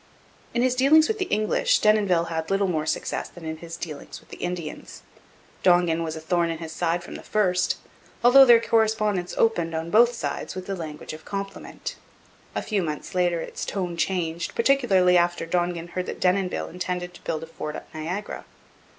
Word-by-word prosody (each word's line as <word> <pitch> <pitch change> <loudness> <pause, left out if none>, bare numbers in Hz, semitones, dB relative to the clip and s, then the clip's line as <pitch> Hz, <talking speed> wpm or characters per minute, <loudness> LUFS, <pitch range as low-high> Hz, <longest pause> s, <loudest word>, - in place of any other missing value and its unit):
In 240 - +2
his 255 -1 +3
dealings 295 +5 +5
with 435 -1 -2
the 375 - 0
English 215 - +2
Denonville 205 -5 +3
had 160 -1 -3
little 195 +1 +2
more 160 -3 -1
success - - -2
than 175 -2 -12
in 160 0 -4
his 165 +1 -8
dealings 155 -4 -7
with - - -24
the - - -9
Indians. 175 -3 -5 0.6
Dongan 175 -2 +4
was 160 -1 -4
a - - -5
thorn 170 +1 0
in 165 - -3
his 160 -1 -7
side 170 +1 -1
from - - -9
the - - -7
first, 180 -4 +1 0.5
although 255 +3 +9
their 240 -3 +7
correspondence 215 -5 +1
opened, 170 -8 +1
on 165 +1 -3
both 240 +3 +5
sides, 225 - -4
with 185 0 -6
the 195 - -3
language 155 -4 -7
of 155 0 -10
compliment. 195 +1 -6 0.6
A - - -1
few 210 -3 0
months 155 +2 -4
later 175 -2 +1
its - - -6
tone 180 -3 -3
changed, 170 -1 -2
particularly 200 -9 +4
after 175 -1 0
Dongan 175 0 -1
heard 185 +1 -4
that - - -5
Denonville 185 0 +1
intended 180 0 -4
to - - -14
build 160 -1 -3
a - - -5
fort 155 -1 -6
at - - -10
Niagara. 175 +6 -5
180 Hz, 190 wpm, -25 LUFS, 165-210 Hz, 0.6 s, although